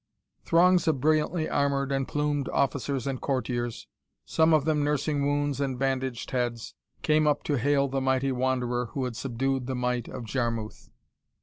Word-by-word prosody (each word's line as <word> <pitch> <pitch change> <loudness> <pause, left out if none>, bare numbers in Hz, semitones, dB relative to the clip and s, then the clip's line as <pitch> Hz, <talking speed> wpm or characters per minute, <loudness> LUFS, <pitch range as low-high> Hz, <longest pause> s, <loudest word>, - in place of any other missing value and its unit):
Throngs 180 +1 +4
of 155 -4 +2
brilliantly 155 +3 +1
armored 140 -1 0
and 135 -1 0
plumed 145 -1 -1
officers 140 -1 0
and 135 -2 -3
courtiers, 120 -3 -2 0.4
some 160 0 +3
of 155 -3 +4
them 155 -2 +1
nursing 145 0 0
wounds 145 -1 0
and 135 -2 -1
bandaged 130 -2 -2
heads, 120 -3 -2 0.3
came 155 0 +3
up 145 -1 +1
to 145 - 0
hail 140 +2 +2
the 135 0 -2
mighty 130 +1 +1
wanderer 125 -1 0
who 135 - -2
had 125 -2 -4
subdued 135 +1 -2
the 130 - -2
might 125 -1 -1
of 125 - -7
Jarmuth. 115 -2 -3
135 Hz, 165 wpm, -27 LUFS, 125-145 Hz, 0.4 s, Throngs